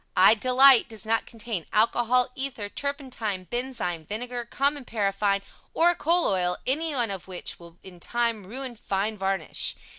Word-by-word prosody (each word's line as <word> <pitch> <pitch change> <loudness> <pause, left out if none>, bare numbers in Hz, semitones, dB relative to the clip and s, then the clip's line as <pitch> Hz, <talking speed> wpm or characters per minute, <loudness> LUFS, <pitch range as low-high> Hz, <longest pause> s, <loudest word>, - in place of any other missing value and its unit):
I 190 +3 +8
DE 230 +3 -2
LITE 265 -1 +7
does 220 -1 -5
not 225 0 +1
contain 220 -6 -5
alcohol, 240 +3 +3
ether, 255 -7 -4
turpentine, 250 -9 -4
benzine, 235 -7 -3
vinegar, 240 +3 -4
common 280 +3 0
paraffine 200 -3 0 0.3
or 345 +1 +5
coal 340 +1 +2
oil, 180 -2 +1
anyone 270 -5 0
of 190 -2 -6
which 185 -2 -6
will 170 0 -15
in 180 -2 -12
time 230 -1 -1
ruin 255 +3 -5
fine 205 0 -2
varnish. 190 -4 -1
225 Hz, 150 wpm, -26 LUFS, 195-255 Hz, 0.3 s, I